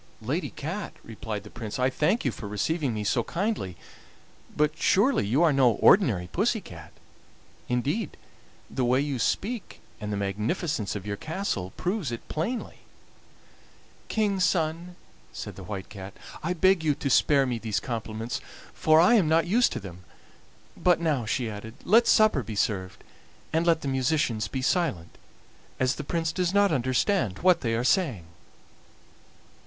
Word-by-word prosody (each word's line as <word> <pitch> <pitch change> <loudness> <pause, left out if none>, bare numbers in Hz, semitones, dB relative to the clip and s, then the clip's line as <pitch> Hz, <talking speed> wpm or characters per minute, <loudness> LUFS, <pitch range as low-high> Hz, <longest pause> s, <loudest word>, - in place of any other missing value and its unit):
"Lady 145 +11 -2
Cat," 175 +8 -5
replied 110 -2 -6
the 105 - -12
Prince, 110 -3 -6
"I 130 +1 +2
thank 170 - +1
you 130 - +2
for 105 - -8
receiving 135 - -1
me 105 -2 -3
so 115 +3 +1
kindly, 175 - -2 0.8
but 150 +1 +2
surely 200 - +2
you 135 +10 +3
are 160 -3 +4
no 130 -4 +4
ordinary 110 - +4
pussy 220 +4 +1
cat? 80 - -12 0.8
Indeed, 140 - -1 0.5
the 130 - -2
way 125 +2 +3
you 140 -2 -1
speak 215 - -2 0.2
and 105 -1 -4
the 100 - -1
magnificence 105 - -2
of 100 -1 -5
your 100 -1 -3
castle 155 - -3
prove 180 - -2
it 115 - -7
plainly." 220 +11 -3 1.3
"King's 200 -4 +1
son," 170 0 0 0.4
said - - -7
the - - -9
White 100 -3 -6
Cat, 95 -1 -9 0.3
"I 170 +3 -1
beg 185 0 +3
you 150 -2 +2
to 140 - -4
spare 140 +2 +4
me 120 -3 -2
these 110 -2 -1
compliments, 115 -1 -4 0.3
for 155 0 +4
I 175 +8 +6
am 195 -10 +4
not 165 +1 +3
used 230 +8 +3
to - - -3
them. 90 -2 -10 0.7
But 180 -1 +3
now," 150 -9 0
she 120 +2 -1
added, 110 +2 -7
"let 230 +4 +5
supper 215 -11 +5
be 110 -1 -7
served, 95 -3 -2 0.5
and 165 +2 +1
let 165 -1 +3
the - - -4
musicians 130 -4 0
be 130 -1 -4
silent, 135 - 0 0.6
as 130 0 +2
the - - -6
Prince 165 +2 -1
does 180 +2 -1
not 200 -1 +4
understand 130 - +1
what 185 -2 +5
they 115 -2 0
are 115 - 0
saying." 130 - +1
140 Hz, 160 wpm, -27 LUFS, 110-175 Hz, 1.3 s, I